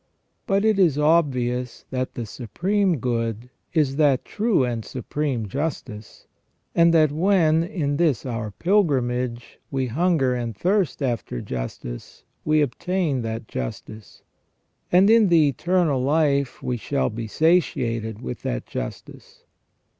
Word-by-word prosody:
But 200 +2 +2
it 215 -2 +3
is 165 -7 +4
obvious 130 -6 +1
that 130 -1 -3
the 120 - -4
Supreme 175 - -1
Good 115 -1 -2 0.2
is 145 -4 +1
that 145 -4 +3
true 215 - +1
and 120 -2 -3
supreme 130 -2 -3
justice; 125 -4 -5 0.5
and 170 0 +5
that 155 -3 +4
when, 165 -1 +3
in 145 -5 -2
this 150 -9 +1
our 115 -4 -3
pilgrimage, 125 - 0
we 135 -2 -1
hunger 140 0 +1
and 120 -4 -4
thirst 185 - 0
after 120 - -2
justice - - -7 0.2
we 155 0 +3
obtain 150 +1 -1
that 115 -1 -5
justice; 95 - -7 0.7
and 185 +3 +6
in 225 -1 +6
the 165 -4 +5
eternal 165 -1 +1
life 140 -2 +1
we 125 - -1
shall 140 +2 -1
be 110 +1 -5
satiated 115 - 0
with 65 - -5
that - - -3
justice. - - -8
140 Hz, 130 wpm, -23 LUFS, 120-170 Hz, 0.7 s, and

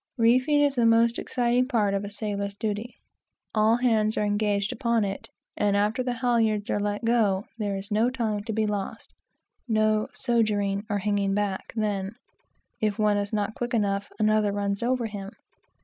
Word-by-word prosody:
Reefing 255 +6 +4
is 285 -1 +3
the 240 -3 +2
most 230 +1 +4
exciting 245 0 +1
part 210 -6 +1
of 200 0 -1
a 205 - -5
sailor's 200 -1 -3
duty. 215 +3 -4 0.6
All 220 +1 +3
hands 220 -3 +2
are - - +1
engaged 205 -1 0
upon 235 -5 +1
it, 195 0 -5 0.3
and 200 -1 +1
after 210 +4 +1
the 250 -1 -1
halyards 230 -4 +1
are - - +1
let 205 +2 -2
go, 215 -4 +2
there 205 -2 -1
is 195 +2 -8
no 220 +4 +3
time 220 -5 -2
to 225 - -3
be 220 0 0
lost 210 +2 -4 0.5
no 215 -1 +2
"sogering," 210 -4 0
or 205 - 0
hanging 200 -1 0
back, 205 -2 -2
then. 205 -2 -2 0.6
If 215 -1 0
one 210 -1 +2
is 200 0 -2
not 210 -1 -1
quick 240 +2 -3
enough, 200 -2 -1
another 215 -1 +2
runs 200 0 -2
over 245 0 0
him. 205 -2 -6
215 Hz, 175 wpm, -26 LUFS, 205-230 Hz, 0.6 s, Reefing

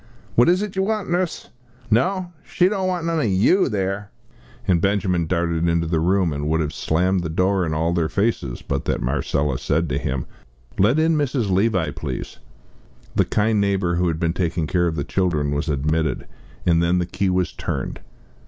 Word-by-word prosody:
"What 120 - +5
is 185 +3 +3
it 210 -2 -5
you 190 - +1
want, 210 -2 -1
Nuss? 175 -1 -1 0.4
No, 180 - +1
she 180 - +2
don't 190 -1 -1
want 180 -3 -1
none 165 -1 0
o' - - +1
you 110 - +3
there!" 100 -1 -2 0.6
And 85 -3 +3
Benjamin 95 -4 +1
darted 85 -1 0
into 85 0 +1
the 80 0 0
room, 90 0 +2
and 75 +1 -3
would 80 +1 +2
have 75 -1 -2
slammed 90 +3 +1
the 80 - -3
door 90 +2 +1
in 80 - -2
all 80 +2 +1
their 85 -2 0
faces, 100 - -1
but - - -3
that - - 0
Marcella 70 -3 -1
said 80 +3 0
to - - -1
him 65 -1 -2 0.5
"Let 110 +9 +4
in 160 +1 +3
Mrs. 130 -8 0
Levi, 95 -5 +2
please." - - -6 0.8
The - - +3
kind 105 0 +1
neighbour, 95 -4 +1
who 90 0 +1
had 80 -1 -1
been 85 -1 0
taking 85 -2 -1
care 85 +1 +1
of 80 - -2
the 70 - -2
children, 80 -5 0
was 75 +3 -1
admitted, 75 +3 0 0.4
and 85 -1 +4
then 85 +1 +2
the 90 - +1
key 95 +2 -1
was 90 -2 0
turned. - - -4
90 Hz, 195 wpm, -22 LUFS, 80-110 Hz, 0.8 s, What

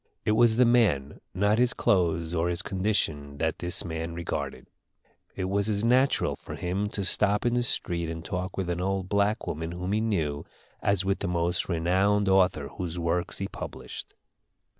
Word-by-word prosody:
It - - +2
was 110 +1 +5
the 125 +2 +5
man, 110 - +2
not 105 +4 +2
his 125 0 +3
clothes 85 -3 +1
or 85 0 +1
his 85 -1 -2
condition, 85 -8 -1
that 80 +4 -1
this 90 0 -1
man 80 0 -4
regarded. 80 -5 -4 0.7
It 95 - -3
was 100 +3 0
as 105 0 0
natural 130 +4 +3
for - - -8
him 95 +4 -2
to 100 -2 -3
stop 105 +3 +3
in 120 - +2
the 120 - +2
street 85 -8 -1
and 80 0 -6
talk 90 +1 -4
with 90 -2 -1
an 85 +1 -2
old 95 0 -1
black 100 +2 +1
woman 80 +2 -4
whom 90 +2 -4
he 105 +1 +1
knew 80 -10 -1 0.4
as 100 -1 +1
with 95 0 0
the 100 - -2
most 85 +1 0
renowned 95 +4 +2
author 90 -7 +3
whose 90 -2 -5
works 85 +1 -1
he 100 - -3
published. - - -8
95 Hz, 180 wpm, -27 LUFS, 85-105 Hz, 0.7 s, was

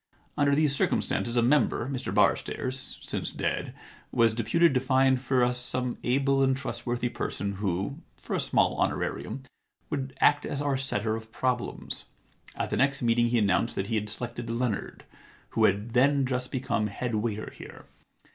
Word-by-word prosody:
Under 140 -1 +3
these 150 -2 +3
circumstances 120 -2 0
a 120 - +4
member, 130 -1 +2
Mr 135 -2 -3
Barstairs, 130 0 +1 0.3
since - - -3
dead, - - -2 0.4
was 115 -2 +4
deputed 155 +8 +3
to 130 - +3
find 130 0 +3
for 130 -1 +2
us 125 0 +1
some 125 0 -3
able 135 +2 +2
and 135 -1 +3
trustworthy 120 -3 -2
person 100 -4 -3
who, 95 -1 -2 0.2
for - - -4
a - - 0
small - - +2
honorarium, 135 - -2 0.5
would 135 -3 -3
act 145 0 +4
as 140 - -3
our 145 -1 +1
setter 110 -5 -1
of 110 0 -8
problems. 125 0 -2 0.5
At - - -3
the - - 0
next 135 -1 +2
meeting 120 0 +3
he 120 +1 +2
announced 105 +1 +2
that 95 - -1
he 115 - 0
had 105 -1 -1
selected 120 +1 -6
Leonard, 115 -2 -2 0.5
who - - +3
had 105 +4 +1
then 135 +2 +4
just 125 0 -2
become 120 -4 0
head 115 +4 -4
waiter 110 0 -2
here. - - -11
125 Hz, 165 wpm, -28 LUFS, 115-135 Hz, 0.5 s, a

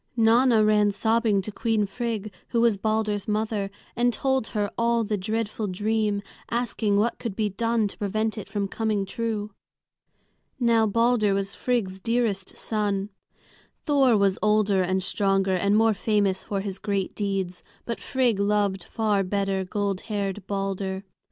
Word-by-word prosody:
Nanna 230 0 +5
ran 210 -1 +4
sobbing 220 -1 +1
to 215 - -4
Queen 225 -1 0
Frigg, 215 -1 -4
who 235 - 0
was 235 -3 +4
Balder's 215 -1 -1
mother, 210 -1 -1 0.3
and 245 +1 +3
told 265 0 0
her 205 -3 -2
all 235 0 +2
the 210 0 -1
dreadful 215 +2 -2
dream, 210 +1 0 0.3
asking 225 -3 0
what 225 +3 +1
could 225 -5 -4
be 215 -1 0
done 230 +2 0
to - - -9
prevent 215 +2 -1
it 215 - -7
from 200 -2 -1
coming 215 -1 -1
true. 215 -1 -3 1.1
Now 230 -2 +3
Balder 230 -2 +2
was 195 0 -1
Queen - - -17
Frigg's 210 -7 0
dearest 225 -3 -1
son. 205 -2 -1 0.7
Thor 270 -6 +4
was 200 -1 +2
older 210 -2 +3
and 185 +1 0
stronger, 195 0 +1
and 200 +3 +2
more 225 0 +4
famous 200 -2 0
for 200 -1 -2
his 195 -1 -5
great 200 -2 -2
deeds; 195 -3 -2 0.2
but 235 - -3
Frigg 250 -6 +1
loved 200 -2 +1
far 215 -3 0
better 195 0 -1
gold 195 0 -2
haired 200 -2 -3
Balder. 195 -1 -2
210 Hz, 155 wpm, -25 LUFS, 195-225 Hz, 1.1 s, Nanna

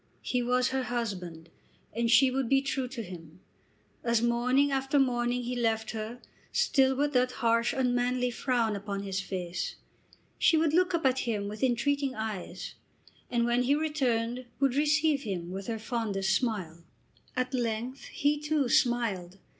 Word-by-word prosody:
He 250 - 0
was 250 +1 +2
her 265 0 0
husband, 185 -9 -4 0.5
and 235 +1 0
she 260 +3 +6
would 260 -2 -1
be 270 0 +4
true 270 -2 -1
to 245 -2 -6
him. 170 -3 -11 0.6
As 235 -1 +2
morning 250 +4 +2
after 270 +1 +1
morning 245 -2 +1
he 245 +1 -3
left 225 -2 0
her, 225 +2 -5 0.3
still 270 - +3
with 290 +2 0
that 250 0 +2
harsh, 230 0 +2
unmanly 250 -1 +1
frown 235 -3 0
upon 200 0 -4
his 195 -1 -2
face, 180 -2 -4 0.6
she 325 - +5
would 315 -1 +2
look 360 +1 +3
up 330 - -2
at 260 0 +3
him 205 -3 -1
with 210 +1 -7
entreating 270 +2 +1
eyes, 220 -4 -5 0.6
and 235 -1 +1
when 240 +1 +2
he 265 +3 +3
returned 255 -6 -1
would 275 -2 +2
receive 300 0 +2
him 180 -7 -4
with 195 +1 -6
her 230 -1 -2
fondest 210 -4 -1
smile. 180 -8 -2 0.5
At 255 +1 -1
length 240 +1 -2
he, 295 -2 0
too, 295 -3 0
smiled. 215 -8 +1
245 Hz, 160 wpm, -29 LUFS, 220-265 Hz, 0.6 s, she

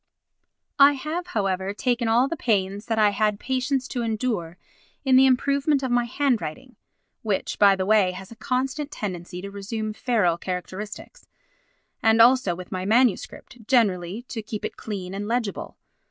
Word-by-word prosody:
I 280 +1 +8
have, 310 +6 -4
however, 195 - -2
taken 240 0 0
all 235 +4 +3
the 335 - -3
pains 205 - -1
that 225 -1 -1
I 210 -1 +4
had 210 0 0
patience 260 0 -1
to 245 - -3
endure 220 -7 -2 0.5
in 260 -1 +4
the 265 +1 +7
improvement 280 +2 +2
of 260 - -1
my 245 0 +2
handwriting 250 - -2 0.5
(which, 205 -4 -2
by 200 -1 +6
the 190 -1 -2
way, 205 -2 +4
has 190 +2 -10
a - - -10
constant 265 +5 -2
tendency 180 - -6
to 200 - -6
resume 215 +2 -4
feral 210 -8 +1
characteristics) 190 - -7 0.7
and 225 0 +4
also 235 -6 +5
with 180 0 -10
my 185 -1 -3
MS. 225 +2 +3 0.4
generally 205 -4 +1
to 240 -2 -6
keep 215 0 -6
it - - -5
clean 195 -4 -6
and 205 +1 -4
legible. 230 -3 -3
220 Hz, 160 wpm, -24 LUFS, 195-255 Hz, 0.7 s, I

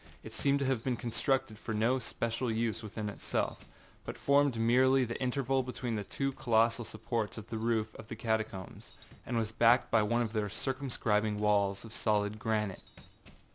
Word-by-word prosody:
It - - -9
seemed 140 0 +2
to - - +1
have 130 -4 0
been 130 -2 0
constructed 120 -1 -1
for 110 -1 -4
no 115 +5 +2
especial 115 0 -2
use 110 0 -1
in 110 0 -5
itself, 105 - -3 0.4
but - - -6
formed 140 -3 +3
merely 130 +3 +4
the 115 +2 -5
interval 130 +1 +1
between 125 -1 -4
two 135 +6 -1
of 135 - -8
the - - -16
colossal 115 -1 +3
supports 110 0 -3
of 110 +1 -8
the 110 - -2
roof 110 -1 0
of 110 - -11
the 110 - -6
catacombs, 110 -4 -3 0.3
and 120 - -1
was 110 -1 -1
backed 120 +2 +4
by 115 - +5
one 120 +3 +2
of 110 -1 -4
their 105 -2 0
circumscribing 110 -5 -1
walls 100 -1 +2
of 110 - -11
solid 105 -1 0
granite. 105 -3 -1
115 Hz, 180 wpm, -32 LUFS, 110-125 Hz, 0.4 s, by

